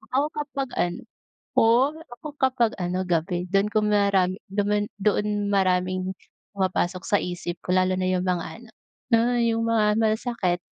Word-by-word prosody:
Ako 280 Hz, +3 st, +3 dB
kapag 280 Hz, -3 st, -4 dB
ano. 175 Hz, 0 st, -1 dB, 0.5 s
Oo, 245 Hz, +6 st, +4 dB, 0.2 s
ako 245 Hz, +5 st, -9 dB
kapag 255 Hz, -4 st, +2 dB
ano, 180 Hz, +1 st, -1 dB
gabi 175 Hz, +1 st, 0 dB
dun 195 Hz, +1 st, +3 dB
kung 210 Hz, 0 st, +1 dB
marami 195 Hz, -2 st, +2 dB
dumaan, 205 Hz, +1 st, 0 dB
doon 205 Hz, 0 st, 0 dB
maraming 185 Hz, -1 st, +1 dB, 0.4 s
pumapasok 185 Hz, -1 st, 0 dB
sa 205 Hz, -, +2 dB
isip 175 Hz, -1 st, -5 dB
ko, 180 Hz, -, 0 dB
lalo 185 Hz, 0 st, +3 dB
na 185 Hz, 0 st, -1 dB
yung 185 Hz, 0 st, 0 dB
mga 180 Hz, -2 st, 0 dB
ano, 235 Hz, 0 st, -15 dB, 0.4 s
alam 230 Hz, 0 st, +6 dB
mo 245 Hz, -, +1 dB
yung 230 Hz, 0 st, +1 dB
mga 225 Hz, -2 st, +3 dB, 0.2 s
masasakit. 220 Hz, -4 st, 0 dB
200 Hz, 155 wpm, -25 LUFS, 185-225 Hz, 0.5 s, alam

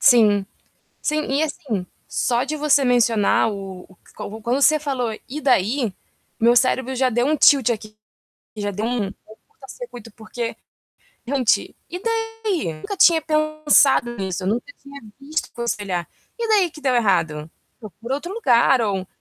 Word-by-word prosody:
Sim, 215 Hz, -6 st, +5 dB, 0.6 s
sim 305 Hz, 0 st, 0 dB
e 275 Hz, +3 st, 0 dB
assim, 280 Hz, -, -3 dB, 0.2 s
só 240 Hz, +1 st, 0 dB
de 305 Hz, +3 st, -3 dB
você 290 Hz, -2 st, +3 dB
mencionar 230 Hz, -3 st, +3 dB
o 195 Hz, -3 st, -7 dB
o 185 Hz, -, -20 dB, 0.2 s
qua 215 Hz, +2 st, -7 dB
quando 245 Hz, +5 st, 0 dB
você 310 Hz, +1 st, +5 dB
falou: 265 Hz, -6 st, -2 dB, 0.2 s
"E 295 Hz, +4 st, -5 dB
daí?", 245 Hz, -3 st, +1 dB, 0.5 s
meu 235 Hz, +1 st, +5 dB
cérebro 260 Hz, +1 st, +2 dB
já 260 Hz, 0 st, +2 dB
deu 240 Hz, +2 st, +1 dB
um -, -, +1 dB
aqui 310 Hz, -, +1 dB
tilt 270 Hz, -4 st, +4 dB
aqui, 215 Hz, -2 st, -5 dB, 0.6 s
já 205 Hz, -1 st, -2 dB
deu 205 Hz, +2 st, -4 dB
um 225 Hz, -5 st, -2 dB
curta 330 Hz, -, -19 dB
circuito 245 Hz, -, -10 dB
porque 230 Hz, +1 st, -5 dB, 0.7 s
gente, 255 Hz, -3 st, +1 dB
e 355 Hz, -, -4 dB
daí? 450 Hz, -, -2 dB
Nunca 155 Hz, -, -6 dB
tinha 335 Hz, -2 st, +6 dB
pensado 305 Hz, -5 st, +2 dB
nisso 190 Hz, -2 st, -4 dB
nunca 235 Hz, -, -2 dB
tinha 280 Hz, 0 st, -11 dB, 0.2 s
visto 305 Hz, +3 st, -3 dB
aconselhar. 205 Hz, -7 st, -3 dB, 0.3 s
E 465 Hz, -1 st, -2 dB
daí 400 Hz, -5 st, +3 dB
que 305 Hz, -, -13 dB
deu 265 Hz, -3 st, +1 dB
errado? 165 Hz, -9 st, +1 dB, 0.3 s
Eu 215 Hz, -3 st, -9 dB
procura 235 Hz, +9 st, -5 dB
outro 340 Hz, +6 st, -5 dB
lugar 255 Hz, -, +4 dB
ou 195 Hz, -4 st, -1 dB
245 Hz, 160 wpm, -21 LUFS, 215-300 Hz, 0.7 s, tinha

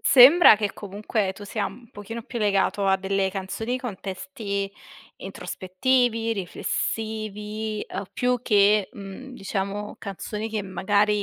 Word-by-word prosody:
Sembra 275 Hz, +1 st, +9 dB
che 205 Hz, -1 st, -1 dB
comunque 205 Hz, 0 st, -2 dB
tu 205 Hz, -, -10 dB
sia 205 Hz, +1 st, -2 dB
un 240 Hz, -2 st, -11 dB
pochino 225 Hz, +3 st, -7 dB
più 235 Hz, -, -6 dB
legato 200 Hz, -1 st, +2 dB
a 190 Hz, 0 st, +4 dB
delle 195 Hz, 0 st, 0 dB
canzoni 220 Hz, +6 st, -3 dB
con 240 Hz, -7 st, -5 dB
testi 200 Hz, 0 st, -4 dB, 0.5 s
introspettivi, 230 Hz, +4 st, 0 dB
riflessivi, 215 Hz, +2 st, -3 dB
uhm, 195 Hz, -, -4 dB
più 250 Hz, -1 st, +1 dB
che, 205 Hz, -3 st, +4 dB
mhmm, 200 Hz, +6 st, -9 dB
diciamo 200 Hz, 0 st, -3 dB
canzoni 210 Hz, +2 st, -5 dB
che 215 Hz, -2 st, -2 dB
magari, 205 Hz, +2 st, +1 dB
210 Hz, 130 wpm, -25 LUFS, 195-225 Hz, 0.5 s, Sembra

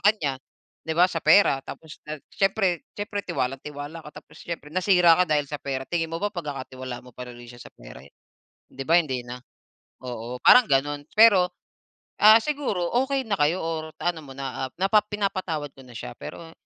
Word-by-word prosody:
kanya, 200 Hz, -10 st, +2 dB, 0.5 s
'di 160 Hz, -, -1 dB
ba 180 Hz, +1 st, +6 dB
sa -, -, -2 dB
pera 200 Hz, -9 st, +5 dB
tapos 160 Hz, -1 st, -10 dB
nag 150 Hz, -1 st, -7 dB
siyempre 195 Hz, -, 0 dB
siyempre 205 Hz, 0 st, -4 dB
tiwalang-tiwala 145 Hz, 0 st, -4 dB
ka 150 Hz, -, -11 dB
tapos -, -, -16 dB
siyempre 165 Hz, -3 st, -6 dB
nasira 180 Hz, -3 st, +5 dB
ka -, -, +2 dB
dahil 150 Hz, -1 st, +2 dB
sa 150 Hz, -, -4 dB
pera. 135 Hz, -1 st, -3 dB
Tingin 165 Hz, -2 st, -1 dB
mo 165 Hz, -, -3 dB
ba 205 Hz, -, 0 dB
pagkakatiwalaan 130 Hz, -5 st, -6 dB
mo -, -, -12 dB
pa 125 Hz, -, -8 dB
rin 120 Hz, -, -11 dB
uli 120 Hz, -, -12 dB
siya 120 Hz, -, -13 dB
sa -, -, -14 dB
pera? -, -, -13 dB, 0.7 s
'Di 135 Hz, -, -7 dB
ba 165 Hz, -, +3 dB
hindi 135 Hz, -7 st, -1 dB
na? 125 Hz, +1 st, -7 dB, 0.7 s
Oo, 120 Hz, +1 st, -6 dB
parang 250 Hz, -1 st, +8 dB
gano'n, 145 Hz, +2 st, +1 dB, 0.2 s
Pero, 200 Hz, -5 st, +7 dB, 0.7 s
ah, 215 Hz, +2 st, +9 dB
siguro 260 Hz, -13 st, -2 dB, 0.2 s
okey 270 Hz, -1 st, 0 dB
na 205 Hz, -, +1 dB
kayo 155 Hz, +5 st, +3 dB
or 160 Hz, -1 st, -4 dB
naano 175 Hz, -2 st, -1 dB
mo 135 Hz, -, -11 dB
na, 135 Hz, -1 st, -4 dB
ah, -, -, -30 dB
napa 205 Hz, +2 st, +4 dB
pinapatawad 190 Hz, -8 st, -3 dB
mo 135 Hz, -, -14 dB
na 120 Hz, -, -14 dB
siya -, -, -7 dB
pero, 165 Hz, -1 st, -9 dB
160 Hz, 190 wpm, -25 LUFS, 135-190 Hz, 0.7 s, ah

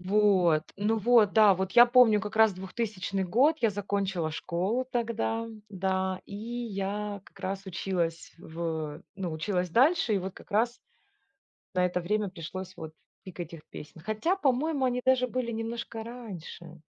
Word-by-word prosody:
Вот, 185 Hz, -5 st, +3 dB
ну 210 Hz, +3 st, +1 dB
вот, 220 Hz, -1 st, +4 dB
да, 215 Hz, -3 st, +7 dB
вот 190 Hz, +1 st, -2 dB
я 240 Hz, 0 st, +9 dB
помню 240 Hz, -3 st, +6 dB
как 210 Hz, 0 st, -6 dB
раз 220 Hz, -2 st, +5 dB
2000-й 195 Hz, 0 st, -3 dB
год, 260 Hz, -, +3 dB
я 230 Hz, -, +4 dB
закончила 195 Hz, -5 st, -2 dB
школу 185 Hz, +10 st, -1 dB
тогда, 230 Hz, -1 st, -1 dB, 0.2 s
да, 190 Hz, -1 st, -1 dB
и 200 Hz, -, -8 dB
я 210 Hz, -3 st, -4 dB
как -, -, -19 dB
раз 195 Hz, +1 st, -4 dB
училась 175 Hz, -3 st, -2 dB
в 160 Hz, -3 st, -4 dB
ну, 185 Hz, -4 st, -3 dB
училась 180 Hz, +3 st, -1 dB
дальше, 260 Hz, -, +3 dB
и -, -, +3 dB
вот 190 Hz, 0 st, -4 dB
как -, -, -15 dB
раз 235 Hz, +4 st, +1 dB, 1.0 s
на 180 Hz, -, +3 dB
это 180 Hz, 0 st, 0 dB
время 210 Hz, +4 st, 0 dB
пришлось 185 Hz, +2 st, -7 dB
вот 160 Hz, -2 st, -8 dB, 0.3 s
пик 185 Hz, -1 st, -9 dB
этих 170 Hz, -2 st, -7 dB
песен. 155 Hz, +2 st, -10 dB
Хотя, 215 Hz, -, 0 dB
по-моему, 280 Hz, -2 st, +1 dB
они 250 Hz, -1 st, +1 dB
даже 260 Hz, -1 st, +4 dB
были 250 Hz, -1 st, -2 dB
немножко 225 Hz, 0 st, -4 dB
раньше, 180 Hz, -8 st, -9 dB
200 Hz, 155 wpm, -29 LUFS, 180-230 Hz, 1.0 s, я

